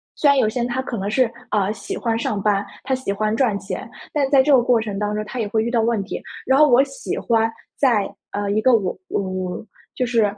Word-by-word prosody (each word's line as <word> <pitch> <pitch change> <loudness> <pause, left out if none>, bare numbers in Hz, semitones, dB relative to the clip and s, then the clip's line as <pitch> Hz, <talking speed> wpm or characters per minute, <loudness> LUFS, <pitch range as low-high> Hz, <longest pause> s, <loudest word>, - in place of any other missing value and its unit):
虽 300 - +2
然 280 - +5
有 225 - +3
些 220 +3 -2
人 240 - 0
他 255 +2 -1
可 255 -2 -5
能 195 0 -2
是 240 +1 +2 0.2
呃， 205 -1 +1
喜 200 -2 -6
欢 230 -1 0
上 210 -3 -1
班， 200 0 +1 0.2
他 265 - -1
喜 260 -6 -2
欢 215 +2 0
赚 225 -5 +2
钱， 200 - -6 0.2
但 280 -3 +1
在 270 -2 +5
这 295 - +2
个 260 - +6
过 240 -1 +3
程 210 -3 -4
当 210 0 -1
中， 215 - -2
他 250 +4 -6
也 220 - -1
会 220 +1 0
遇 235 - -1
到 235 -2 +2
问 225 -2 +1
题。 195 - -6 0.2
然 265 +2 +3
后 305 - +7
我 255 0 +6
喜 - - -5
欢 225 -1 +2 0.3
在， 215 -8 +2 0.2
呃， 205 0 -2
一 215 +1 +1
个 255 +1 +5
我 195 -5 0 0.2
我 185 0 -3 0.3
就 255 - 0
是， 235 -2 +2
225 Hz, 270 characters per minute, -21 LUFS, 205-255 Hz, 0.3 s, 后